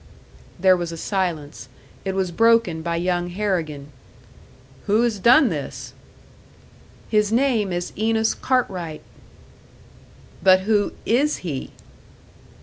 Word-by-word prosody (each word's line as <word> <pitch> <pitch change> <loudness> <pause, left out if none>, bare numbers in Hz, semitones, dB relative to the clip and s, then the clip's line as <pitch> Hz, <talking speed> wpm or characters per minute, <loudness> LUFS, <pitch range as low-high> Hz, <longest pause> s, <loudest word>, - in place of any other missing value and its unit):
There 185 +1 +5
was 175 -2 -4
a 165 - -7
silence. 170 -6 -3 0.4
It 190 0 -2
was 190 -2 -1
broken 225 -4 +3
by 170 +1 -2
young 175 0 -1
Harrigan. 170 -7 -3 1.0
"Who 215 +3 +3
has 230 -4 0
done 245 +6 +5
this?" 135 -5 -6 1.2
"His 210 -1 +2
name 230 -5 +1
is 175 0 -4
Enos 220 +1 +1
Cartwright." 185 -11 -2 1.4
"But 185 -1 +5
who 205 +1 +1
is 275 +7 +1
he?" 140 -6 -4
190 Hz, 110 wpm, -22 LUFS, 170-220 Hz, 1.4 s, There